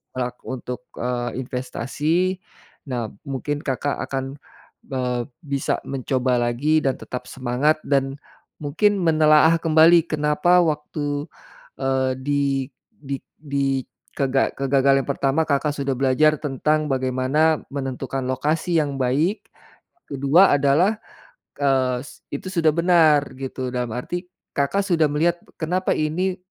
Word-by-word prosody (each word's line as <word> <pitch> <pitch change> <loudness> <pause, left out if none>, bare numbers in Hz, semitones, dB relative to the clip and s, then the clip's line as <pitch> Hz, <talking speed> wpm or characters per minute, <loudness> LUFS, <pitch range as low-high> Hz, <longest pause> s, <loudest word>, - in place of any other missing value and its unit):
lak 125 -1 -3
untuk, 125 -1 -5 0.2
eee, 120 +1 -3
investasi, 150 +9 -1 0.5
nah 120 -5 -3 0.2
mungkin 140 +2 -3
Kakak 140 0 -2
akan, 135 +1 -4 0.5
eee, 125 -2 -2 0.2
bisa 140 -2 -1
mencoba 130 -1 0
lagi 125 +7 +2
dan 135 -1 +1
tetap 125 - -6
semangat 130 +4 +1
dan 135 -1 0 0.5
mungkin 205 +9 +2
menelaah 155 0 +5
kembali 165 +1 +5
kenapa 155 +4 +3
waktu 150 -1 -2 0.5
eee, 130 -1 +1
di 145 0 +1 0.5
di 140 -1 -6 0.2
di 140 -2 -1 0.3
kega 135 -1 +1
kegagalan 135 0 +3
yang - - -1
pertama 140 +3 +1
Kakak 145 +1 +1
sudah 140 -1 -1
belajar 140 +4 +3
tentang 150 +2 0
bagaimana 130 +4 +1
menentukan 135 -1 -3
lokasi 155 +6 0
yang 145 -2 -1
baik, 150 - 0 0.6
ke-2 145 +7 +4
adalah, 145 +10 +3 0.6
eee, 130 -3 +2 0.3
itu 140 - -5
sudah 165 -4 +3
benar 165 -4 +5 0.2
gitu 130 -1 -4
dalam 125 -1 -2
arti, 175 +8 -4 0.3
Kakak 145 +8 +1
sudah 165 -5 +3
melihat 170 +4 +1 0.2
kenapa 180 +3 0
ini 180 +5 -1
140 Hz, 120 wpm, -22 LUFS, 130-155 Hz, 0.6 s, menelaah